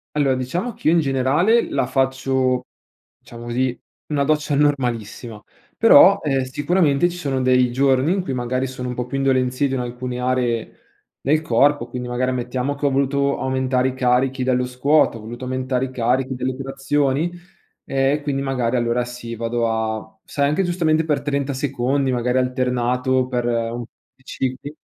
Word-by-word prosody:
Allora, 140 -3 +2
diciamo 170 - -3
che - - -4
io 165 - +4
in 170 - +4
generale, 145 - +2
la 125 - 0
faccio, 130 -1 0 0.5
diciamo 120 0 -12
così, 125 +1 -1 0.3
una 145 -2 +1
doccia 150 0 0
normalissima, 120 -6 -1 0.3
però, 200 -3 +7
ehm, 135 -3 0
sicuramente 145 +3 +1
ci 175 - -8
sono 140 -6 -2
dei 125 -1 +3
giorni 135 +3 +2
in 195 - 0
cui 175 -7 -4
magari 130 +1 -1
sono 125 -1 -6
un 125 - -4
po' 125 - -3
più 135 - -3
indolenzito 130 0 +1
in 135 - -1
alcune 125 +1 -5
aree 125 -2 -1 0.4
del 155 +3 +1
corpo, 145 +1 +2
quindi 125 -1 -5
magari 125 +1 0
ammettiamo 125 +2 -2
che 145 - -4
ho 140 - +3
voluto 140 +1 +1
aumentare 130 -1 0
i 130 - -6
carichi 130 +1 +1
dello 125 0 +1
squat, 130 +3 +2
ho - - -7
voluto 120 +4 -8
aumentare 130 0 -1
i 130 - -8
carichi 130 +2 0
delle 130 +1 -2
trazioni, 135 +3 -1 0.5
ehm, 135 0 +1
e 150 - -2
quindi 140 -2 -2
magari 130 -3 -1
allora 120 0 0
sì 120 -1 -7
vado 115 +1 -1
a 110 -1 -3
sai 140 -1 0
anche 155 +7 +1
giustamente 165 -3 +1
per 150 -3 0
30 140 -1 -1
secondi 135 0 0
magari 125 0 0
alternato 125 0 0
per 125 -2 -1
un 115 0 -2 0.3
tricipi 130 +2 -5
130 Hz, 170 wpm, -21 LUFS, 125-140 Hz, 0.5 s, però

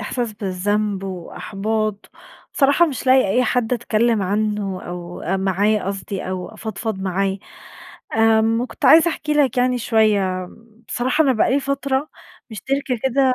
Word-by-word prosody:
إحساس 230 +1 -3
بالذنب 205 +1 -2
وإحباط، 200 +3 -4 0.4
صراحة 285 +5 +4
مش 270 -3 -5
لَاقية 260 -2 +5
أي 250 +6 +2
حد 245 -1 0
أتكلّم 230 -2 +1
عنّه 205 -1 -1
أو 175 0 -7
أ - - -1
معاه 195 +3 +1
قصدي 195 -1 -4
أو 185 -1 -4
أفضفض 220 -1 -5
معاه، 195 +1 -1 0.8
آمم 225 0 +3
وكنت 250 - -6
عايزة 320 +5 +7
أحكي 300 -1 -3
لَك 280 -5 +2
يعني 250 0 +2
شويّة، 210 -5 +1 0.5
بصراحة 260 +6 +1
أنا 270 - +3
بقى 220 - +2
لي 275 +2 +2
فترة 275 +1 -1 0.4
مشتركة 255 +4 -2
كده 265 0 +3
220 Hz, 140 wpm, -20 LUFS, 195-255 Hz, 0.8 s, عايزة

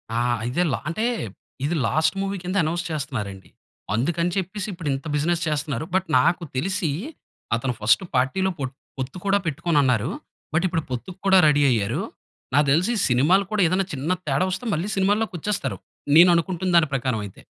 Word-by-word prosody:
ఆ! - - +1 0.3
ఇదెల 160 +2 +1
అంటే 195 +7 -1 0.6
ఇది 165 +4 0
లాస్ట్ 160 +4 +1
మూవీ 195 0 -2
కింద 180 +2 -3
అనౌన్స్ 170 +2 -1
చేస్తున్నారు 140 -9 -3
అండి. 95 -1 -15 0.5
అందుకని 170 +8 0
చెప్పేసి, 190 +2 -3
ఇప్పుడు 165 -4 -4
ఇంత 135 +2 -5
బిజినెస్ 165 +3 +1
చేస్తన్నారు. 150 -3 -2
బట్ 190 0 +1
నాకు 170 +7 +2
తెలిసి, 180 +4 -1 0.7
అతను 125 +2 -1
ఫస్ట్ 110 - +4
పార్టీలో 190 +10 +1
పొట్ 130 -1 -3 0.3
పొత్తు 130 +5 -4
కూడా 200 0 +4
పెట్టుకోనున్నారు. 145 -6 +1 0.4
బట్ 160 +3 +2
ఇప్పుడు 165 -3 -1
పొత్తుక్కూడా 190 +9 +1
రెడీ 145 -1 +4
అయ్యారు. 105 -4 0 0.5
నాకు 145 +2 +4
తెలిసి 180 +10 +2
సినిమాలు 150 +10 +3
కూడా 215 -1 +1
ఏదైనా 185 +3 +1
చిన్న 145 +5 -2 0.2
తేడా 140 +5 +2
వస్తే, 215 +7 -4
మళ్ళీ 165 +5 -1
సినిమాలోకి 205 +1 +1
వచ్చేస్తారు. 205 +4 -2 0.4
నేను 175 +2 +9
అనుకుంటున్న 180 +1 -1
దాని 160 -3 +3
ప్రకారం 125 -3 0
అయితే. 95 - -12
160 Hz, 160 wpm, -23 LUFS, 135-185 Hz, 0.7 s, నేను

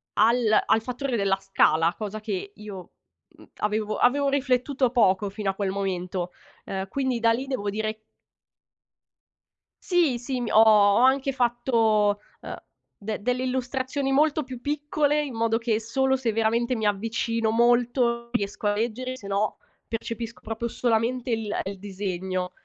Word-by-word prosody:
al 225 0 +4
al 220 - +3
fattore 250 +1 -3
della 195 -1 +1
scala, 170 -4 +2
cosa 215 -1 -5
che 200 -2 -4
io, 205 -4 -9 0.5
mhmm, - - -16
avevo 210 0 -1
avevo 280 +3 +3
riflettuto 260 -1 +1
poco 205 -4 +3
fino 200 0 -3
a 195 - 0
quel 195 -1 -1
momento. 185 -2 -3 0.3
Uhm, 190 0 -4
quindi 260 -1 -1
da 230 0 +4
lì 260 +4 -2
devo 230 -7 -2
dire 215 +1 -3 1.8
Sì, 335 -9 +2
sì, 250 +1 -3
mi 235 - -3
ho - - +3
ho 210 -2 +6
anche 270 +1 +3
fatto, 230 -5 +2 0.2
uhm, - - -6 0.4
de 210 0 -5
delle 250 +3 0
illustrazioni 260 +2 -2
molto 300 +2 +3
più 255 -2 -8
piccole, 295 +1 0
in 275 - -6
modo 225 0 +1
che 230 -2 0
solo 265 +4 +1
se 240 -4 -1
veramente 230 +3 +1
mi 220 -2 -2
avvicino 225 +2 0
molto 240 0 +2
riesco 210 -2 -2
a 205 - +3
leggere, 245 +4 -2
se 205 -6 -10
no 200 +1 -1 0.3
percepisco 230 0 -5
proprio 225 +1 -4
solamente 235 +1 0
il 225 -2 -1
il 195 0 -6
disegno 185 -2 -3
230 Hz, 150 wpm, -25 LUFS, 205-255 Hz, 1.8 s, ho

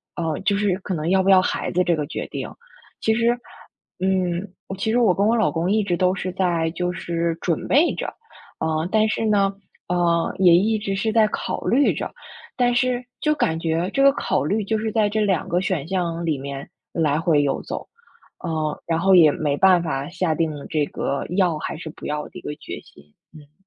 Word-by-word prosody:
呃， 160 -3 -2
就 200 +1 +1
是 205 -3 +1
可 190 - -3
能 160 +1 -2
要 190 0 +3
不 195 - +1
要 190 -1 +7
孩 - - -2
子 180 - +2
这 170 -1 +2
个 150 -1 -2
决 - - -5
定。 - - -6 0.5
其 220 0 +1
实 235 +1 +2 0.6
嗯， 185 -1 0 0.3
其 220 +3 -1
实 235 - +2
我 220 -7 +4
跟 200 - +2
我 225 +2 +3
老 220 - +3
公 170 +3 -1
一 215 0 +3
直 180 -4 0
都 180 +1 +2
是 190 -1 -3
在 170 -3 +1
就 180 +1 -2
是 170 -2 -2
准 170 -4 -2
备 300 +6 +4
着， - - -4 0.5
嗯， 160 +1 -1
但 215 0 +3
是 225 - -1
呢， 200 -2 +2 0.3
呃， 170 -1 +1
也 180 -3 +6
一 215 +4 +2
直 200 -2 -3
是 220 +2 -1
在 220 -1 +5
考 - - -3
虑 275 +4 +3
着， - - -4 0.5
但 245 -1 +2
是 250 0 +1 0.2
就 305 0 +2
感 160 - 0
觉， 165 +2 -1
这 275 - +3
个 275 - +7
考 205 - -1
虑 205 +8 0
就 220 +1 0
是 220 0 -2
在 215 -1 +2
这 215 +1 0
两 195 -5 +1
个 175 +2 +1
选 165 -6 -2
项 170 -3 -2
里 155 -4 0
面 140 0 -7 0.2
来 155 -3 +1
回 160 -4 +3
游 140 - -1
走。 - - -6 0.6
嗯， 155 -2 -2
然 165 -1 0
后 190 +1 +5
也 160 -4 +7
没 145 -2 -1
办 185 +1 +5
法 145 -3 -3
下 175 -3 -1
定 160 -1 0 0.2
这 150 -2 +1
个 140 - -3
要 180 -4 +1
还 - - -5
是 160 -1 -7
不 - - -11
要 150 0 -2
的 - - -13
一 - - -9
个 - - -5
决 - - -8
心。 75 +1 -20 0.2
嗯。 150 -1 -15
180 Hz, 235 characters per minute, -22 LUFS, 160-210 Hz, 0.6 s, 要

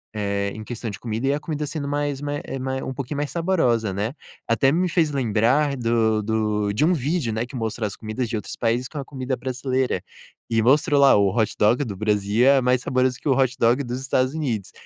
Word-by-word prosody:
eh, 100 -1 -1
em 110 - -7
questão 115 0 -5
de 100 -2 -7
comida, 115 +2 -3
e 140 - +3
a 145 - -1
comida 150 -1 -3
sendo 145 -1 -4
mais 145 -1 -2
ma 145 0 -3
é 135 - -5
mai 130 0 -3
um 130 - -4
pouquinho 140 +2 -5
mais 145 0 -2
saborosa, 130 - +1
né? 105 +7 -2 0.3
Até 135 +4 +3
me 180 +3 +1
fez 160 -3 +2
lembrar 135 +3 +2
do 115 -2 +1
do 105 -1 0
de 125 - +1
um 180 - +3
vídeo, 150 -3 -1
né, 110 +2 -1
que 125 - -11
mostra 110 -1 -2
as 100 - -7
comidas 110 +2 -4
de 115 - -2
outros 105 - -5
países 120 +2 0
com 155 - -9
a 135 - -5
comida 130 -1 -3
brasileira, 130 -4 -1 0.5
e 115 - +2
mostrou 145 +3 +4
lá 140 - +7
o 100 -1 +4
hot 110 -3 +1
dog 115 +7 +3
do 100 - -5
Brasil 105 +3 +2
é 135 -1 +6
mais 125 0 +2
saboroso 130 0 +1
que - - -3
o 135 - +3
hot 130 -1 +2
dog 120 +4 +3
dos 125 0 -4
Estados 130 0 0
Unidos. 125 -11 -3
125 Hz, 230 wpm, -23 LUFS, 110-140 Hz, 0.5 s, lá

